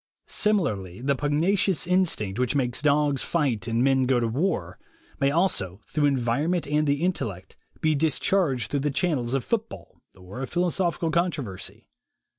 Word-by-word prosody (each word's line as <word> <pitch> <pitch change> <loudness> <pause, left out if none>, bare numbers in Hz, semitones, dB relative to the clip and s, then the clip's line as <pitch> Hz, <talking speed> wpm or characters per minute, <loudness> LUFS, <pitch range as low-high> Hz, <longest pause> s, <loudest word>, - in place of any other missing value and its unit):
Similarly, 105 - 0
the 140 +3 +1
pugnacious 170 +6 +1
instinct, 170 - +1
which 125 +2 0
makes 125 -2 0
dogs 145 -2 +2
fight 135 -10 -1
and 115 +1 +1
men 135 -1 +3
go 130 -2 +3
to 115 - 0
war, 120 - -1 0.4
may 135 - +3
also, 140 - 0
through 150 -2 +1
environment 140 +6 0
and 150 +1 +1
the 145 +3 +1
intellect, 100 - -3 0.3
be 155 0 +3
discharged 150 - +1
through 145 - +1
the 145 +2 0
channels 135 -5 0
of 135 - -1
football 225 -1 -4 0.2
or 95 +7 -9
a 135 - -3
philosophical 175 -1 0
controversy. 150 - -2
145 Hz, 150 wpm, -25 LUFS, 120-170 Hz, 0.4 s, men